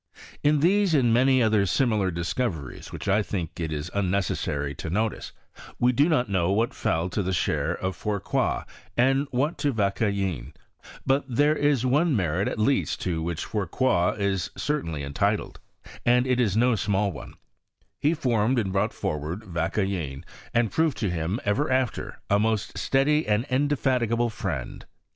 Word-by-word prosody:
In 150 0 +3
these, 190 +1 +3
andmany 130 0 +4
other 105 -3 +3
similar 110 -5 +1
discoveries.whidt 85 - -4
I 100 +3 +3
think 90 -5 -4
it 80 -1 -3
unnecessary 90 -7 -1
to 80 - -6
notice, 110 +5 -2 0.5
we 125 +1 +3
do 145 +6 +3
not 130 -7 +2
know 95 -3 +1
what 115 +4 +1
fell 80 +2 0
to 100 - -1
the 95 -1 -2
share 80 -2 0
of 95 0 -3
Fourcroy 105 -2 -1 0.3
and 135 +3 +3
what 140 +7 -1
to 145 - +1
Vauquelin; 100 - -1 0.5
but 135 +1 +2
there 145 +5 +3
is 145 -4 +2
one 145 +4 +3
merit 90 -1 0
at - - -3
least 130 +6 +1
to 85 -3 -1
which 85 0 -3
Fourcroy 95 -1 0
is 100 -3 -1
certainly 85 - -2
entitled, 70 0 -1 0.4
and 125 +1 +4
it 130 -1 +1
is 110 -5 +2
no 125 +2 +4
small 100 -2 0
one: 70 -6 -10 0.6
he 155 +4 +2
formed 120 -3 +1
and 100 -5 0
brought 95 - +1
forward 75 +7 -3
Vauqudin, 85 -5 -2 0.3
and 120 -2 +1
proved 160 -3 +1
to 105 -5 -1
him, 85 +6 -2
ever 130 +8 +1
after, 130 -2 -1
a 100 - +3
most 110 -1 0
steady 150 +3 +2
and 105 +3 +1
indefatigable 125 -4 +1
friend. 90 - -5
105 Hz, 155 wpm, -26 LUFS, 90-130 Hz, 0.6 s, andmany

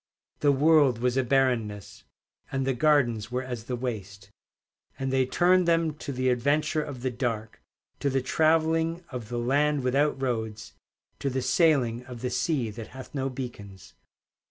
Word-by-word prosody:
The 145 - +4
world 145 -3 +4
was 125 +1 0
a 130 - +2
barrenness, 120 -6 0 0.5
And 135 -1 -1
the 135 - +1
gardens 120 -6 +2
were 125 +1 -2
as 125 -3 -6
the 125 - -3
waste. 100 -5 -6 0.7
And 135 0 -2
they 130 -1 +2
turned 180 +4 +3
them 165 -2 +2
to 145 - -6
the 130 -1 0
adventure 145 +5 +1
of 140 -5 -7
the 130 - 0
dark, 115 -3 -3 0.4
To 140 - 0
the 135 -1 0
travelling 160 +3 +2
of 120 -4 -6
the 120 - -3
land 140 +4 +1
without 135 +2 +1
roads, 110 -4 -3 0.5
To 140 - -1
the 130 -1 -2
sailing 125 -3 +2
of 125 -3 -9
the 125 - -2
sea 125 -1 0
that 110 +1 -8
hath 130 0 -11
no 135 -2 -1
beacons. 110 -7 -8
130 Hz, 165 wpm, -27 LUFS, 120-145 Hz, 0.7 s, The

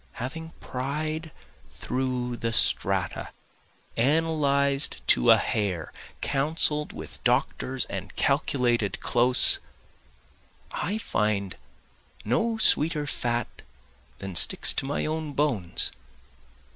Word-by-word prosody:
Having 160 +6 -6
pried 155 +5 -4 0.5
through 125 -1 -2
the 115 0 -2
strata, - - +1 0.7
analyzed 140 - +2
to - - +4
a - - +8
hair, 95 -7 -2 0.3
counsel'd 150 +1 +2
with - - -9
doctors 130 0 0
and - - -7
calculated 120 -6 +1
close, 125 +1 +3 1.1
I 205 +4 -2
find 105 - -1 0.7
no 220 - 0
sweeter 155 -7 +3
fat 120 -4 -3 0.6
than 95 -2 -7
sticks - - +4
to 135 - -3
my 145 - -2
own 155 -1 -3
bones. 130 - 0
135 Hz, 95 wpm, -26 LUFS, 120-155 Hz, 1.1 s, a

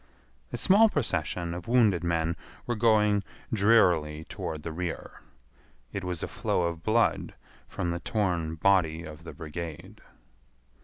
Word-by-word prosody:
A - - -3
small 215 +4 +6
procession 85 - -1
of 90 0 -7
wounded 110 -8 +3
men 85 -1 0 0.3
were 120 - -1
going 105 -3 +3 0.3
drearily 90 -8 +3
toward 80 -1 -6
the 85 - -4
rear. 85 +1 -5 0.7
It 100 - -3
was 90 -2 -3
a - - -2
flow 90 - -1
of 85 -1 -2
blood 115 +5 +1 0.3
from 90 -2 -3
the 85 - -2
torn 85 -6 -1
body 85 -2 +2
of 80 0 -10
the - - -7
brigade. 85 +4 -7
85 Hz, 140 wpm, -28 LUFS, 80-105 Hz, 0.7 s, small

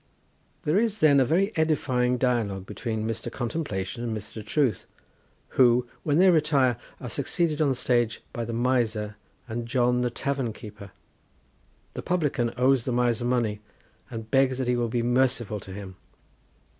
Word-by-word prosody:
There 155 +7 +2
is 220 -2 0
then 150 -7 +5
a 130 - +4
very 190 - +1
edifying 130 -6 +1
dialogue 115 -7 0
between 110 +2 -3
Mr. 115 +1 -4
Contemplation 120 - -3
and 115 -2 -2
Mr. 110 +1 -7
Truth, 115 - 0 0.6
who, 125 -1 +4
when 145 -1 +1
they 185 +1 +6
retire, 145 -7 +3 0.2
are - - -6
succeeded 165 -3 0
on 150 - +3
the 135 - +1
stage 120 -2 0
by 120 - -3
the 115 - -4
Miser 115 -3 0 0.3
and 115 0 -4
John 125 0 +2
the 125 - +1
Tavern 130 -1 -2
keeper. 105 -3 -10 1.0
The - - -5
publican 145 -9 0
owes 130 -1 +3
the 130 - -1
Miser 120 -1 +1
money, 120 -4 0 0.5
and 115 -2 -7
begs 135 -1 +3
that 130 -2 -2
he 125 - +2
will 120 -1 0
be 120 +1 0
merciful 120 -3 +1
to 95 - -11
him. 95 -1 -8
125 Hz, 160 wpm, -26 LUFS, 115-135 Hz, 1.0 s, they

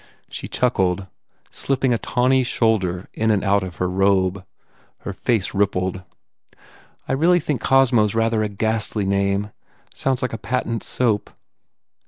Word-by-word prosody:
She - - -6
chuckled, 95 -6 0 0.5
slipping 130 -2 0
a 115 - 0
tawny 130 +1 +2
shoulder 100 -7 0
in 110 0 0
and 105 -3 +2
out 100 0 +2
of 90 -2 -6
her 90 - -1
robe. 95 0 +1 0.6
Her 100 - -5
face 110 -1 -1
rippled, 95 -2 0 1.1
"I - - -1
really 170 +6 +4
think 145 -6 -2
Cosmo 130 -5 +4
s 105 - -3
a - - -1
rather 115 -1 +1
ghastly 105 0 -1
name. 100 +1 0 0.4
Sounds 135 -1 -1
like 125 - -2
a 115 - -4
patent 120 -3 -2
soup. 115 -5 0
110 Hz, 145 wpm, -21 LUFS, 95-125 Hz, 1.1 s, really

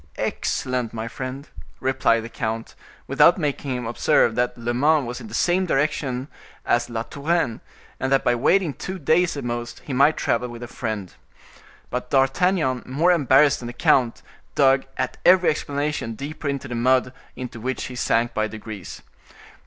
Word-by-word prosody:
"Excellent, 125 -3 -2
my 110 0 -4
friend," 130 +4 -6 0.3
replied 130 -3 +2
the 115 - -7
count, 115 0 -4 0.3
without 175 - +5
making 145 -4 -2
him 125 -1 -4
observe 115 0 +2
that 125 +2 -1
Le 120 0 -2
Mans 145 +3 +3
was 120 +1 -6
in - - -9
the - - -11
same 180 +1 +2
directions 135 -3 0 0.4
as 120 0 +1
La 115 -1 -3
Touraine, 145 -3 -1 0.4
and 130 +1 -1
that 135 - +3
by 120 - +3
waiting 155 +7 +2
two 190 +6 -6
days, 165 +1 +2
at - - -4
most, 120 0 -4
he 140 - -4
might 140 +4 +4
travel 125 - 0
with 120 0 -8
a - - -6
friend. 110 -6 -5 0.8
But 125 0 -3
D'Artagnan, 135 0 +2
more 155 +8 +2
embarrassed 145 -3 +4
than 120 - -7
the 120 - -6
count, 120 -1 +2 0.3
dug, 135 -1 +4
at - - -2
every 180 0 +6
explanation, 145 -5 -3
deeper 150 +4 -6
into 140 -1 -3
the 125 - -6
mud, 125 +1 +2 0.2
into 125 -2 -7
which 130 +3 -3
he 130 - -6
sank 120 -1 +1
by 110 0 0
degrees. 110 -3 -8
130 Hz, 170 wpm, -23 LUFS, 120-145 Hz, 0.8 s, every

